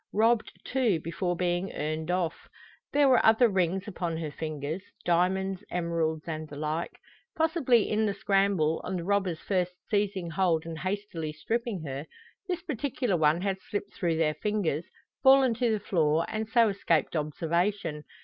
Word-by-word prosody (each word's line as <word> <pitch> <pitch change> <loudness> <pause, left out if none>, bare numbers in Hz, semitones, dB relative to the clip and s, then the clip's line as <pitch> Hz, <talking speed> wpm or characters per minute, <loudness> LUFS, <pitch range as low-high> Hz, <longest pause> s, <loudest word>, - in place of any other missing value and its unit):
Robbed, 225 +2 +2
too, 240 -10 +1
before 170 +3 -2
being 175 +1 -1
earned 155 +2 -3
off. 180 -2 -1 0.4
There 285 -1 +4
were 255 -2 +5
other 225 +2 +6
rings 190 0 0
upon 170 -4 -3
her 160 -2 -4
fingers 155 +2 -4 0.2
diamonds, 185 +2 +1
emeralds, 165 -2 -1
and 155 -1 -4
the 145 - -9
like. 155 +3 -3 0.4
Possibly 315 -8 +3
in 215 0 +1
the 200 - -1
scramble, 195 -6 +2
on 185 - -3
the 175 - -3
robbers 190 -3 0
first 180 -2 -1 0.2
seizing 195 -4 0
hold 165 -3 +1
and 165 -1 -6
hastily 185 -4 -3
stripping 215 +4 -3
her, 140 +1 -5 0.4
this 360 -1 -2
particular 270 - -1
one 155 +1 +3
had 190 -1 -1
slipped 205 +1 -5
through 170 -3 0
their 155 -2 +2
fingers, 180 -5 -1 0.4
fallen 265 -2 +6
to 240 +1 +1
the 215 - +1
floor, 165 -5 +1
and 220 0 -3
so 230 -2 +5
escaped 175 -5 0
observation. 165 +2 -1
185 Hz, 160 wpm, -28 LUFS, 160-210 Hz, 0.4 s, other